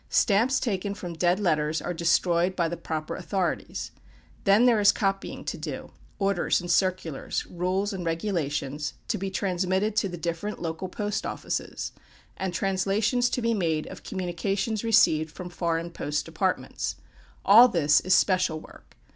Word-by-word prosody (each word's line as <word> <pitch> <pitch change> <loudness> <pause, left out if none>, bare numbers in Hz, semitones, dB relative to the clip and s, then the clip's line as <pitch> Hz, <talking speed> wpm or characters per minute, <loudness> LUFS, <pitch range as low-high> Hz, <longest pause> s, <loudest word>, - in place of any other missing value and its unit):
Stamps 235 +5 +3
taken 200 -3 -2
from 180 -3 -6
dead 175 +3 +2
letters 155 -5 +1
are 180 - -3
destroyed 170 +2 +2
by 170 -2 +1
the 170 - -3
proper 155 -2 -4
authorities. 185 0 -2 0.5
Then, 205 +4 +5
there 235 -3 +5
is 205 -1 +6
copying 195 -1 -2
to - - -4
do - - -6 0.3
orders 200 -1 +1
and 175 -1 -3
circulars, 185 -6 0
rules 185 +4 -1
and 185 -2 -4
regulations, 150 -5 -2
to 215 - 0
be 195 +1 -2
transmitted 190 +2 0
to 200 -2 +2
the 175 - -6
different 170 +5 -3
local 165 +2 -4
post 205 +2 -2
offices; - - -4 0.4
and 190 -1 -3
translations 200 +6 +1
to 245 - -2
be 230 0 +2
made 165 -7 0
of - - -9
communications 195 +4 -2
received 160 -9 +4
from 180 -1 -8
foreign 170 -1 -2
post 150 -2 -2
departments. 180 +3 -2 0.5
All 225 +5 +9
this 155 -9 +3
is 185 +1 +3
"Special" 185 -5 +2
work. - - -16
185 Hz, 155 wpm, -26 LUFS, 170-200 Hz, 0.5 s, All